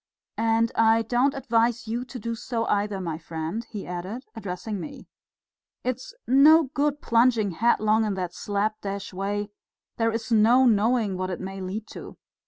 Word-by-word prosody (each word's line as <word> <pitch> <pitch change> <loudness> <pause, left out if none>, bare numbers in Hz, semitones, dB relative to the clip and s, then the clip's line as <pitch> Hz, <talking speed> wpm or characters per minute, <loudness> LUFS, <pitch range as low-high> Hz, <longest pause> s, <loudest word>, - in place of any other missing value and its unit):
"And 225 0 +2
I 225 0 +4
don't 245 +5 +1
advise 235 -3 +1
you 235 +3 -2
to 255 0 -8
do 230 0 -4
so 230 0 -3
either, 205 -1 0
my 165 -4 -4
friend," 165 +7 -4
he 210 -3 -6
added, 185 +8 -6
addressing 205 0 -5
me. 280 +6 -8 0.8
"It's 255 - -4
no 290 +2 +6
good 290 0 0
plunging 230 -3 +3
headlong 215 +2 +2
in 210 -2 -1
that 180 -2 -4
slap 210 +3 -2
dash 200 -1 -5
way; 205 +2 -3 0.5
there's 225 0 -1
no 230 +4 +5
knowing 220 -3 +2
what 185 0 -2
it 180 - -4
may 190 +1 -6
lead 195 +4 -4
to. - - -10
225 Hz, 160 wpm, -25 LUFS, 200-240 Hz, 0.8 s, no